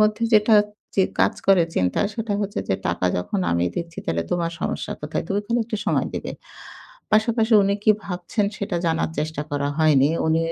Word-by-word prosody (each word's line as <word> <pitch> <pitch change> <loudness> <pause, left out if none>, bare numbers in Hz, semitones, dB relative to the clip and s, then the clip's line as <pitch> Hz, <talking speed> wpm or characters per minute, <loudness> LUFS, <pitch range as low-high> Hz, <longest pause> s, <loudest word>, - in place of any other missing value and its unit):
মধ্যে 215 +1 +2
যেটা 215 +1 +5 0.4
যে 190 - +5 0.2
কাজ - - +3
করে 190 -3 +6
চিন্তা 90 -1 +1
সেটা 225 -1 -3
হচ্ছে 205 0 -3
যে, 95 - +2
"টাকা 85 +1 0
যখন 140 - -2
আমিই 85 +1 +1
দিচ্ছি 170 -1 -5
তালে 85 0 0
তোমার 170 -1 0
সমস্যা - - -3
কোথায়? 150 +1 -3
তুমি 200 +1 0
খালি 235 +2 +1
একটু 220 0 -3
সময় - - +1
দিবে।" - - -4 0.8
পাশাপাশি 220 +1 +2
উনি 200 +1 +2
কি - - +6
ভাবছেন 180 +3 -2
সেটা 195 -3 -3
জানার 160 0 0
চেষ্টা 155 -1 -2
করা 145 0 -1
হয়নি। 145 -3 +4 0.2
উনি 160 0 +3
175 Hz, 185 wpm, -23 LUFS, 150-210 Hz, 0.8 s, করে